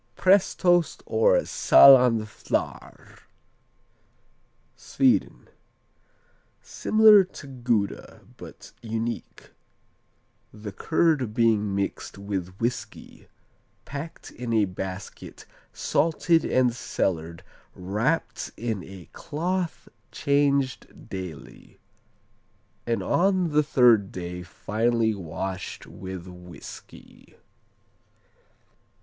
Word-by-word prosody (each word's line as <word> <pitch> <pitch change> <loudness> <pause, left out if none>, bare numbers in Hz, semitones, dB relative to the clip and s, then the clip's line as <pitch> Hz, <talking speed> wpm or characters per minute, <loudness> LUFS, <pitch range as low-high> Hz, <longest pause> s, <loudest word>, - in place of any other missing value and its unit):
Prestost 185 -3 +2
or - - +3
Saaland 125 - +6
Flarr 110 - -5 1.6
Sweden - - 0 1.2
Similar 215 -2 +5
to 185 -4 -12
Gouda, 120 -6 -3
but - - -12
unique 115 0 -5 1.0
the 105 -1 -8
curd 145 - 0
being 110 -4 +2
mixed 100 0 -4
with 95 -2 -5
whiskey, 120 +2 -5 0.6
packed 145 +3 -8
in 120 -1 -5
a 110 -2 +3
basket, 95 0 -8 0.3
salted 165 +1 +1
and 125 -2 +2
cellared, 85 -7 -3 0.3
wrapped 105 - -2
in 110 -5 -3
a 95 -3 -12
cloth 175 +3 -3 0.2
changed 140 -2 -1
daily; 90 -5 -9 1.1
and 115 -1 -1
on 185 -1 +1
the 150 +1 +4
third 120 -8 +4
day 90 0 -6
finally 110 +6 -1
washed 95 0 -6
with 95 -2 -8
whiskey. 90 -4 -13
115 Hz, 80 wpm, -25 LUFS, 95-150 Hz, 1.6 s, Saaland